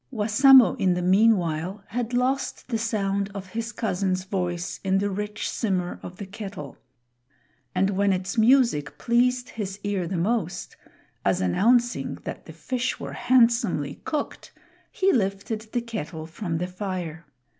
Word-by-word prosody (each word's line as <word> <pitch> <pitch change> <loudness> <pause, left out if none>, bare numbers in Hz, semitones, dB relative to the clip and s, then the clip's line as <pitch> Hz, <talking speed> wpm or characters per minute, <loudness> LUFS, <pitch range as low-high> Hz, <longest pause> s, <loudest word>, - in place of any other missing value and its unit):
Wassamo 255 +3 +6
in 185 -3 +3
the 180 - -1
meanwhile 185 -2 +2
had 235 +2 -2
lost 255 +2 -1
the 230 - 0
sound 200 -3 -1
of 190 -1 -6
his 230 +3 -4
cousin's 185 -5 -1
voice 180 -3 -3
in 190 0 +2
the 200 +1 0
rich 210 +2 -3
simmer 185 -5 -2
of 180 - -8
the 200 - -6
kettle; 195 -7 -8 1.0
and 195 +1 +2
when 200 +1 +2
its 185 +1 -2
music 230 - +3
pleased 245 +1 +1
his 200 -3 -5
ear 200 -4 -1
the 185 +1 -2
most, 185 -1 -1 0.5
as - - +2
announcing 235 - +2
that - - -7
the - - -9
fish 255 0 -2
were - - -6
handsomely 230 - +2
cooked, 300 -2 -4 0.4
he 385 +1 +2
lifted 215 +1 -2
the 240 - 0
kettle 180 -9 -6
from 165 +1 -4
the 175 - -1
fire. 180 -4 -5
200 Hz, 145 wpm, -25 LUFS, 185-235 Hz, 1.0 s, Wassamo